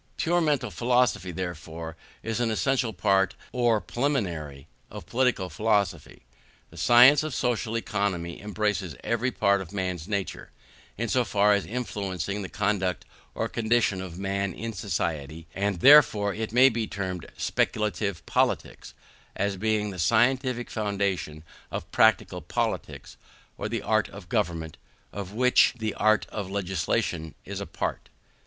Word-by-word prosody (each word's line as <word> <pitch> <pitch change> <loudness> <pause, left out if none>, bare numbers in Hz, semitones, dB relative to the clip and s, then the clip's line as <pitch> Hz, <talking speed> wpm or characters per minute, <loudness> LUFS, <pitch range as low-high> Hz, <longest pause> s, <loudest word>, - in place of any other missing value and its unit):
Pure 175 +1 +2
mental 145 -8 0
philosophy, 120 -2 +1
therefore, 85 -2 -6 0.3
is 115 +1 -2
an 120 -2 +1
essential 125 +1 +1
part, 95 0 +2 0.2
or 120 -3 +2
preliminary, 90 - -2 0.2
of - - -9
political 125 -6 +1
philosophy. 105 +3 -1 0.5
The - - -14
science 125 +4 +7
of 155 -4 -4
social 115 -2 -1
economy 95 -6 -2
embraces 105 -5 -2
every 115 +2 0
part 100 -5 +2
of 95 - -9
man's 90 -4 -3
nature, 100 -3 -3 0.5
in 115 +2 -1
so 125 +3 +2
far 105 -1 +3
as 100 -5 0
influencing 100 -4 -3
the 95 - -6
conduct 95 -3 -1 0.3
or - - -1
condition 110 -4 +1
of 90 -2 -7
man 100 -1 -2
in 115 0 -5
society; 80 -6 -3
and 100 -3 -1
therefore 110 -9 +7 0.2
may 125 +3 +6
it 135 - +5
be 115 -1 -1
termed 95 -3 -4
speculative 100 -4 -1
politics, - - -1 0.4
as 100 0 -1
being 105 +1 0
the 90 - -8
scientific 120 - +2
foundation 100 -7 -2 0.3
of - - -6
practical - - +3
politics, - - -3 0.4
or - - -4
the - - -3
art - - +1
of - - -12
government, 80 -2 -2 0.4
of 100 -2 -6
which 125 +2 +4
the 110 -2 -2
art 110 0 +2
of 100 -3 -5
legislation 95 -3 -2
is - - -5
a - - -5
part. - - -4
100 Hz, 140 wpm, -26 LUFS, 90-115 Hz, 0.5 s, science